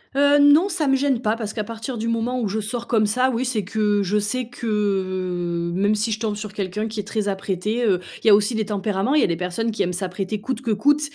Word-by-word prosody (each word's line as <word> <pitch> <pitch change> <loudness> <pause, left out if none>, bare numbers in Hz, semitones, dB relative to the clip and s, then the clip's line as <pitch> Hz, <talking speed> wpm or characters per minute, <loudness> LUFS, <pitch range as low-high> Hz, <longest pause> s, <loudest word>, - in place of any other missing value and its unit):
Heu, 285 +1 +5
non, 295 +7 +6
ça 325 -5 -1
me 270 - +4
gêne 270 -3 +1
pas, 215 +1 +2
parce 215 -3 -5
qu'à 215 - -2
partir 230 +3 -6
du 225 +1 -3
moment 230 +2 -1
où 225 - -1
je 205 +3 -2
sors 230 +3 -4
comme 215 -3 +2
ça, 255 +5 +2
oui, 240 +3 -1
c'est 230 -5 -1
que 205 +1 +1
je 205 +3 +1
sais 245 +4 -2
que, 240 -1 -7
heu, 185 -4 -1
même 200 +4 +2
si 215 +2 -1
je 215 - -2
tombe 215 -3 -1
sur 210 0 -7
quelqu'un 210 +2 -3
qui 220 -1 -5
est - - -2
très 215 0 -2
apprêté, 195 +3 -2
heu, 185 -4 +3 0.2
il - - -1
y - - +9
a 205 - +9
aussi 210 +3 +1
des 220 -1 -1
tempéraments, 205 +4 -1
il 305 - +5
y - - +3
a - - +3
des 170 - 0
personnes 180 +6 -2
qui 220 - -3
aiment 180 - +1
s'apprêter 190 +3 -3
coûte 250 +3 -4
que 245 - -4
coûte 290 +8 +3
215 Hz, 275 wpm, -22 LUFS, 200-235 Hz, 0.2 s, y